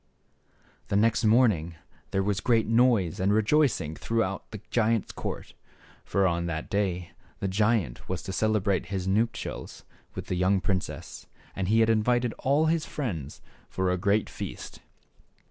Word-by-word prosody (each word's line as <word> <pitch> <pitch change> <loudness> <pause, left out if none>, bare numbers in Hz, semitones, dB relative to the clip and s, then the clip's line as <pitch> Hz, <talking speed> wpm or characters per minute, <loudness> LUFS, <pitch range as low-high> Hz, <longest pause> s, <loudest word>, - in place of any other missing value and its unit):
The - - -1
next 110 +3 +3
morning 105 -8 +3 0.3
there 95 - 0
was 100 0 0
great 115 -2 +2
noise 115 -7 +3
and 95 +2 +2
rejoicing 110 - +2
throughout 110 -3 -2
the 110 - -7
giant's 115 -2 +1
court; - - -6 0.5
for 100 -1 +1
on 85 -1 0
that 80 -2 -4
day 90 -4 -1 0.3
the 100 - -1
giant 105 - 0
was 95 -2 -3
to 95 - -5
celebrate 105 -2 +1
his 95 -2 -3
nuptials 115 +4 -2 0.3
with - - -5
the - - -3
young 95 +2 +2
princess, 95 +1 -4 0.3
and 95 -2 -2
he 110 +3 +4
had 110 - +3
invited 120 +2 +2
all 145 +4 +2
his 160 0 +1
friends 85 - -5 0.3
for 95 -1 0
a 90 - 0
great 100 +2 +2
feast. - - -7
105 Hz, 150 wpm, -27 LUFS, 95-115 Hz, 0.5 s, he